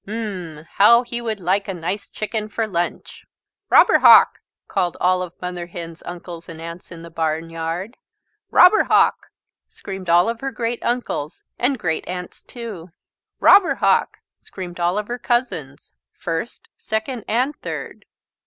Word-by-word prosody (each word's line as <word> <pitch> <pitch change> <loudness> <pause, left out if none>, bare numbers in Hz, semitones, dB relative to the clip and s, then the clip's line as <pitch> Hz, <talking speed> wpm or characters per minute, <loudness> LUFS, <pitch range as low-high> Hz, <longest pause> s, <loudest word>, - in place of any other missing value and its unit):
"Um!" 185 -8 -6
How 235 +4 +7
he 240 0 -5
would 220 -3 -3
like 190 +3 0
a 195 - -4
nice 180 +4 -4
chicken 215 0 -4
for 225 +2 -1
lunch! 175 -4 -4 0.4
"Robber - - +6
Hawk!" - - +7 0.3
called 175 -1 -1
all 185 0 +2
of 180 -1 -7
Mother 180 -1 -5
Hen's 170 -1 -8
uncles 175 -1 -8
and 165 -1 -9
aunts 170 +2 -9
in 165 -1 -10
the 170 - -11
barnyard. 165 +5 -3 0.5
"Robber 360 +4 +6
Hawk!" - - +3 0.4
screamed 190 -2 -8
all 175 +3 +5
of 230 0 -3
her 270 - -2
great 235 -1 -3
uncles 240 -11 -3 0.2
and 260 +2 +1
great 160 -7 -2
aunts 180 0 -6
too. 215 -8 -9 0.5
"Robber 395 -2 +6
Hawk!" - - +2 0.2
screamed 180 -2 -9
all 175 +3 +1
of 210 0 -2
her 245 +1 -4
cousins, 165 - -2 0.2
first, 165 +9 -5
second, 220 +2 -3
and 255 +6 0
third. - - -7
185 Hz, 150 wpm, -21 LUFS, 170-230 Hz, 0.5 s, How